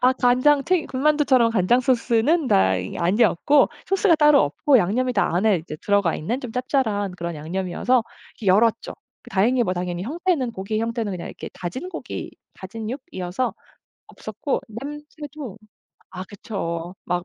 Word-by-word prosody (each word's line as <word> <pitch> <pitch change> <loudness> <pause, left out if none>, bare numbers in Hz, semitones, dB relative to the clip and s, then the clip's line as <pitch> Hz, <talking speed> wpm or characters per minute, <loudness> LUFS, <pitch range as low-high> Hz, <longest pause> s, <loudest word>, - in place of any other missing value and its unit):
아 255 +1 +5
간장 260 +3 +3
튀김 355 -2 +1
군만두처럼 270 -3 +3
간장 230 +3 +3
소스는 255 +5 +2
다 95 - +3
이 90 0 -5
아니었고 210 +9 +3 0.2
소스가 390 -2 +3
따로 300 -2 +5
없고 255 - +3
양념이 245 +7 0
다 200 -6 +1
안에 195 +2 +3
인제 155 -1 -7
들어가 200 -4 +2
있는 230 - -3
좀 250 -4 -7
짭짤한 225 -6 -1
그런 170 0 -4
양념이어서 185 +10 0 0.4
열었죠. 220 +4 +3 0.3
다행히 240 +5 +2
뭐 185 - -1
당연히 175 0 -3
형태는 315 - -1
고기의 215 +2 -3
형태는 230 -2 -2
그냥 180 - -6
이렇게 - - -8
다진 185 - -6
고기 - - -6 0.2
다짐육이어서 220 0 -4 0.5
없었고 280 - -4
냄새도 290 0 -8 0.6
아 185 0 -5
그쵸. 180 -4 -5
막 175 0 -2
230 Hz, 335 characters per minute, -23 LUFS, 185-265 Hz, 0.6 s, 아